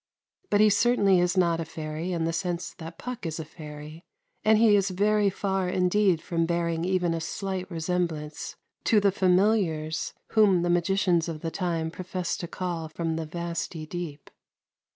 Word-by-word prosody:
But 205 - +4
he 215 -1 +6
certainly 200 -3 +4
is 180 +2 +1
not 170 -2 +3
a - - -1
fairy 160 +2 -5
in 165 -2 -1
the 165 - -1
sense 175 0 -3
that 165 0 -8
Puck 250 -1 -6
is 165 -1 -3
a 160 - -4
fairy; 150 +1 -10 0.4
and 220 0 +5
he 220 -2 +6
is 200 -1 +2
very 205 +2 +2
far 195 -1 -1
indeed 180 -2 +2
from 165 -1 0
bearing 170 -1 0
even 180 -2 +1
a 165 - -2
slight 185 +2 -4
resemblance 165 -3 -3 0.3
to 220 - +5
the 200 -1 +3
familiars 180 -5 +1
whom 200 -5 +4
the 175 - +1
magicians 175 -1 +2
of 155 -2 -5
the 165 - -3
time 165 -3 -2
professed 180 0 -3
to 170 - -4
call 170 -3 -4
from 165 0 -2
the 160 -1 -3
vasty 170 -1 -4
deep. 155 -3 -7
175 Hz, 175 wpm, -27 LUFS, 165-190 Hz, 0.4 s, he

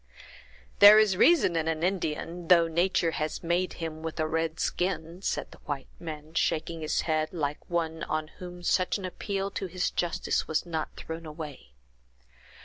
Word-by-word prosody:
"There 205 +1 +11
is 215 -3 +5
reason 255 - +5
in 160 -1 0
an 160 0 -1
Indian, 175 -1 -2
though 170 -1 +6
nature 170 0 +1
has 155 +1 -3
made 175 +2 0
him 160 -2 -5
with 160 -1 -5
a 155 - +2
red 160 +1 -1
skin!" 175 -1 -2
said - - -2
the - - -14
white 140 -2 -5
man, 155 -1 -8
shaking 165 0 0
his 155 - 0
head 155 -1 0
like 150 -4 -3
one 165 -2 -1
on 155 0 -2
whom 180 -1 -8
such 185 +2 +2
an 195 - -6
appeal 195 +1 -3
to 195 - -3
his 180 0 -1
justice 175 -2 -1
was 160 +2 0
not 160 -2 -3
thrown 165 0 -7
away. 150 - -9
165 Hz, 170 wpm, -28 LUFS, 155-180 Hz, -, There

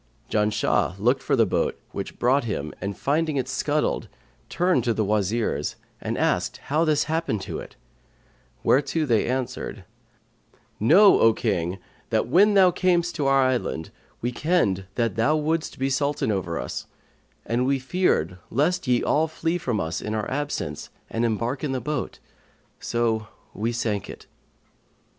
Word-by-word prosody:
Janshah 105 -3 +1
looked 125 +6 +2
for - - +1
the 115 -3 +4
boat 95 - -1
which - - -6
brought 130 +2 +2
him 80 -9 -3
and 100 0 -4
finding 155 +1 0
it 130 -1 -1
scuttled 150 +3 0 0.4
turned 175 -7 +2
to 115 -2 +1
the 110 - +1
Wazirs 105 -5 0 0.3
and - - -3
asked - - 0
how 155 +3 0
this 155 -2 +2
had 155 - -4
happened 160 -12 -1
to 85 -5 -5
it; - - -10 0.9
whereto 145 +4 +2
they 115 -6 +2
answered, 130 0 -3 0.9
'Know, 185 - +6
O 115 0 +6
King, 95 -5 -1 0.3
that, - - +1
when 200 - +5
thou 185 -2 +6
camest 175 -1 +1
to 140 - -1
our 135 0 +4
island, 125 -11 -1 0.3
we 120 - -1
kenned 120 - +1
that 115 -3 0
thou 140 +7 +3
wouldst 155 +1 -1
be 135 - 0
Sultan 140 -3 0
over 90 -4 -2
us - - -5 0.6
and 120 +2 0
we 140 0 +2
feared 130 - 0
lest 165 +6 0
ye 125 -1 +2
all 155 +2 +2
flee 165 +2 -2
from 120 -9 -1
us, 80 -1 -2
in 110 - -3
our 110 - -2
absence; 140 - -3 0.2
and 115 - -1
embark 115 +4 -1
in 140 -3 -1
the 130 - -1
boat, 150 +5 -3 0.6
so 115 -2 -1 0.3
we 115 +3 -1
sank 110 -4 -2
it.' - - -10
125 Hz, 160 wpm, -24 LUFS, 110-150 Hz, 0.9 s, Know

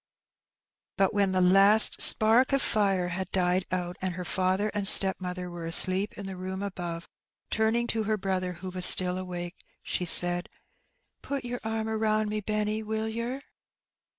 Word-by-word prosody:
But 195 -1 0
when 200 -2 0
the 185 0 -1
last 195 +4 +4
spark 230 +5 +5
of 275 - +1
fire 195 -4 -1
had 185 +1 -6
died 180 0 -1
out, 180 -1 -5
and 185 -1 -5
her 180 -1 -8
father 190 +3 -2
and 205 -1 +1
stepmother 180 -2 +2
were 175 -1 -9
asleep 185 +4 +6
in 200 - -9
the 190 -1 -8
room 190 +1 -7
above, 175 -4 -7 0.4
turning 225 +2 -1
to 220 -1 -3
her 215 +1 -2
brother, 185 -2 -4
who 185 +2 -10
was 180 0 +1
still 180 0 +7
awake, 175 -1 -9 0.2
she 180 - -4
said, 175 +1 0 0.7
"Put 275 -3 -6
your 245 0 -6
arm 220 0 -5
about 215 -1 -2
me, 215 0 -4
Benny, 215 +1 -4
will 220 0 -5
yer?'' 235 +4 -6
195 Hz, 165 wpm, -25 LUFS, 180-215 Hz, 0.7 s, still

